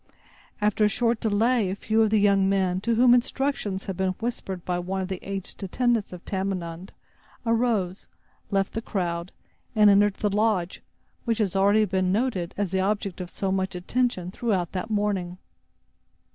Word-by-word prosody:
After 210 +1 +2
a - - +6
short 230 +2 +1
delay, 220 0 +2
a 190 - -2
few 220 +2 +1
of 220 - +4
the 215 - +3
young 200 -1 +4
men, 190 -2 +1
to 230 +2 +1
whom 245 +1 +6
instructions 245 -5 0
had 195 - -4
been 190 -1 0
whispered 195 -6 -4
by 180 -1 -1
one 185 +2 -3
of 190 0 -3
the 190 -2 -3
aged 195 0 -6
attendants 230 +3 0
of 180 -1 -10
Tamenund, 190 -2 -4 0.5
arose, 225 -6 0 0.4
left 195 -1 0
the 225 - -2
crowd, 175 -5 -3 0.4
and 210 -1 +7
entered 205 0 +4
the 210 -2 -1
lodge 210 -5 0 0.4
which 230 -2 +1
has 200 -5 0
already 200 +3 +4
been 185 -1 0
noted 200 -5 -1
as 200 -3 -1
the 190 -1 +1
object 200 -2 -1
of 180 - -6
so 195 +1 -2
much 190 0 -1
attention 185 -1 -1
throughout 190 -6 -1
that 190 +4 -4
morning. 200 -4 -1
195 Hz, 175 wpm, -25 LUFS, 185-220 Hz, 0.5 s, and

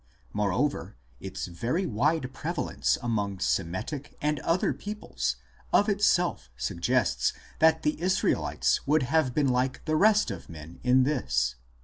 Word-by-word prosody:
Moreover, 105 - -1 0.2
its - - -5
very 120 - -2
wide 135 +2 0
prevalence 165 +2 -1
among 105 -5 -1
Semitic 95 - -2
and 150 0 0
other 165 +7 +1
peoples 210 +1 -3 0.4
of 205 - +4
itself 195 -4 +2
suggests 85 - 0 0.3
that 160 0 +4
the 150 +1 0
Israelites 185 +1 +1
would 150 0 +3
have 130 -1 +1
been 145 -3 +3
like 125 +1 0
the 155 -1 +1
rest 210 +5 +4
of - - -8
men 80 0 -10
in 130 +1 +5
this. 65 - 0
135 Hz, 130 wpm, -28 LUFS, 105-160 Hz, 0.4 s, in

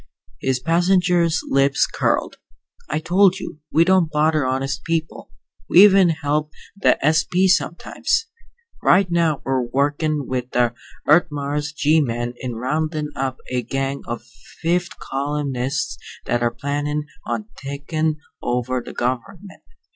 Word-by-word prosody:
His 130 -1 0
passenger's 175 +2 +2
lips 135 0 +3
curled. - - -1 0.5
"I 150 - 0
told 185 +4 +3
you, 150 - -8
we 165 - +5
don't 185 -3 +3
bother 150 -2 +2
honest 130 0 -2
people. 165 -1 -3 0.4
We 185 - +8
even 195 -3 +6
help 150 -1 -1 0.3
the 200 - +3
S.P. 175 +4 +3
sometimes. 190 - 0 0.6
Right 185 -1 +4
now 165 -4 +1
we're 135 -1 +1
workin' 145 +4 0
with 125 -1 -4
the 120 -1 +2 0.3
Earth 160 +4 +5
Mars 145 0 -3
G 155 +1 +3
men 120 -2 -2
in 125 -2 -5
roundin' 150 +5 -2
up 130 -1 -2
a 125 -1 0
gang 135 +3 -3
of 120 -1 -4 0.4
fifth 175 +1 0
columnists 140 -1 -2 0.3
that 120 0 0
are 120 - +2
plannin' 145 +4 -2 0.2
on 110 -2 -3
takin' 145 +3 -2 0.2
over 125 +1 -1
the - - -10
gov'ment. 170 +11 -4
145 Hz, 130 wpm, -21 LUFS, 130-165 Hz, 0.6 s, We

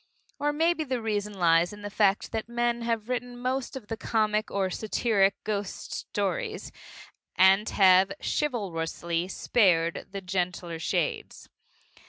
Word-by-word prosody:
Or 295 +1 +1
maybe 325 +2 +1
the 260 -4 -2
reason 210 -2 -2
lies 170 -1 +3
in 205 0 -11
the 205 - -5
fact 200 -1 +2
that 225 +1 -4
men 240 0 0
have 230 -2 -2
written 245 0 -3
most 255 +2 -2
of 260 -5 -7
the 225 - -4
comic 215 -1 0
or 190 -2 -1
satiric 205 -2 +1
ghost 205 -2 -4
stories, 465 -4 -3 0.6
and 195 +3 +5
have 190 0 +5
chivalrously 170 - -2
spared 175 -5 +1
the 195 0 -6
gentler 180 -2 -3
shades. - - -2
210 Hz, 135 wpm, -27 LUFS, 185-240 Hz, 0.6 s, and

